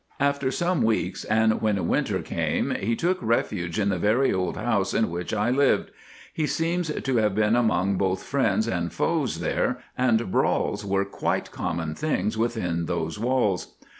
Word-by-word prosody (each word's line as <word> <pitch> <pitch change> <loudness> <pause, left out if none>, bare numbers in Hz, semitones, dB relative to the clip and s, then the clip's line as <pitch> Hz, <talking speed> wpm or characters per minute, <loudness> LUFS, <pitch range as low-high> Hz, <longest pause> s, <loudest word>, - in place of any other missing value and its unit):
"After 140 -1 +1
some 175 +5 0
weeks, 110 -1 0
and 110 0 +2
when 105 -3 +1
winter - - 0
came, - - -1
he 115 +4 -1
took 180 +7 0
refuge 105 -6 -1
in 100 -1 +2
the 95 -3 0
very 115 +8 +2
old 90 -2 -1
house 110 -4 0
in 110 -6 +1
which 85 +1 -4
I 110 +2 +1
lived. 140 +1 +2 0.4
He 155 -2 -1
seems 170 +1 -1
to 135 -4 -1
have 105 -3 +2
been 110 +1 +3
among 100 -5 +2
both 95 -1 0
friends 110 -5 +1
and 85 -6 -1
foes 145 - -1
there, - - 0 0.2
and 120 -5 +1
brawls - - +1
were 100 0 0
quite 100 - -2
common 80 -2 -3
things 145 - -1
within 100 -8 -1
those 80 +1 -2
walls. 115 -6 0
110 Hz, 165 wpm, -25 LUFS, 95-130 Hz, 0.4 s, been